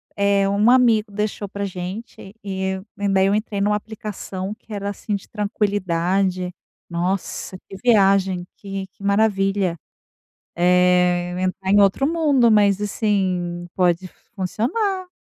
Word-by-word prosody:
eh, 200 -1 +2
um 205 +4 +4
amigo 230 -4 +4
deixou 210 0 -3
para 200 +1 -5
a - - 0
gente 190 +2 -7
e 190 -1 -3 0.2
e 200 0 -1
daí 190 0 +3
eu 200 - +2
entrei 210 -2 -2
numa 210 +1 +2
aplicação 210 -2 -5
que 225 -1 -13
era, 200 0 -3
assim, 205 +1 -3
de 195 - -7
tranquilidade, 190 -3 0 0.4
nossa, 180 +2 -3
que - - -10
viagem, 195 -5 +3
que 195 -1 -6
que 190 +1 -18
maravilha. 200 -3 +1 0.8
Eh, 180 0 +3
entrar 185 +1 -2
em 205 - +6
outro 200 +7 +3
mundo, 295 -7 +3
mas, 205 -2 +4
assim, 185 -5 -1
pode 180 0 +1 0.3
funcionar. 365 - -1
200 Hz, 135 wpm, -21 LUFS, 185-210 Hz, 0.8 s, em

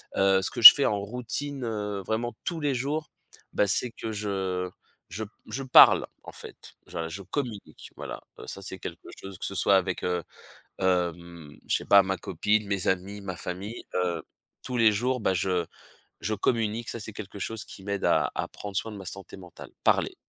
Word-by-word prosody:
heu, 95 0 +4
ce 95 - -2
que - - -6
je 110 - +15
fais 140 - +1
en 105 - +1
routine, 125 +5 -5
heu, 105 -3 -3
vraiment 115 +2 -2
tous 170 -3 -2
les 145 -2 +1
jours, 145 +5 -3 0.4
bah, 105 - +2
c'est 115 +5 +3
que 110 -1 -6
je 95 -3 -2 0.4
je 110 - -5
p - - -15 0.2
je 135 - -4
parle 130 - +7 0.2
en - - -10
fait, - - -12
je 80 0 -5
je 95 +5 -7
communique 105 - -6
voilà. - - -7 0.2
Heu, - - -10
ça - - -7
c'est - - -6
quelque - - -8
chose 95 -1 -9
que - - -5
ce 100 - -5
soit 100 +1 +4
avec, 95 -2 0
heu, 90 -1 -1 0.5
hem, 85 -4 -2
je - - +2
sais - - -9
pas 100 -1 +7
ma 95 0 -2
copine, 105 +5 0
mes 100 -2 -1
amis, 95 +2 -1
ma 95 -2 -5
famille, 100 +8 -6
heu, 90 -2 0 0.4
tous 125 - -4
les 115 -2 +6
jours, 125 +5 0
bah, 100 -4 +1
je 90 -1 0 0.6
je 110 - -1
communique, 115 +1 -1
ça 115 - -5
c'est 110 - -5
quelque 105 -1 -9
chose 110 +2 -4
qui 95 - -12
m'aide 100 0 -2
à - - +2
à - - -3
prendre 100 -2 -7
soin 110 +2 -2
de - - -8
ma 95 - -8
santé 95 +2 -8
mentale, 90 -2 -12
parler. - - +2
100 Hz, 205 wpm, -27 LUFS, 95-115 Hz, 0.6 s, je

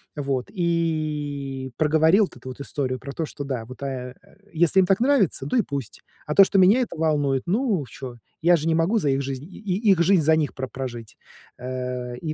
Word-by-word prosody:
вот 135 -4 -2
и 150 - -2
проговорил 160 +6 +4
вот - - -14
эту 130 +1 -9
вот 130 - -9
историю 130 -3 -3
про 140 - -8
то, 160 - -2
что 145 - -7
да, 130 -5 -4
вот, 130 +4 -12
э, 125 -2 -5
э, - - -23 0.2
если 170 +3 +3
им 185 - +5
так 195 +1 +3
нравится, 240 - +2
да 195 - 0
и - - +5
пусть. 140 - -6 0.2
А 150 - -2
то, 195 - +9
что 195 - +1
меня 205 +8 +5
это 235 - -4
волнует, 145 -4 +1
ну, 200 - 0
чё, 130 -3 -8 0.3
я 175 +1 +5
же 160 0 -2
не 165 - +3
могу 170 +8 +2
за 150 -9 +1
их 135 +1 +1
жизнь 135 +1 -5
и 200 +2 0
их 180 -3 +3
жизнь 180 0 +4
за 160 +1 +4
них 155 -2 -1
про 130 0 -4
прожить. 120 -5 -7 0.4
Э. 125 -1 -5
И 155 +3 -4
150 Hz, 220 wpm, -24 LUFS, 130-175 Hz, 0.4 s, то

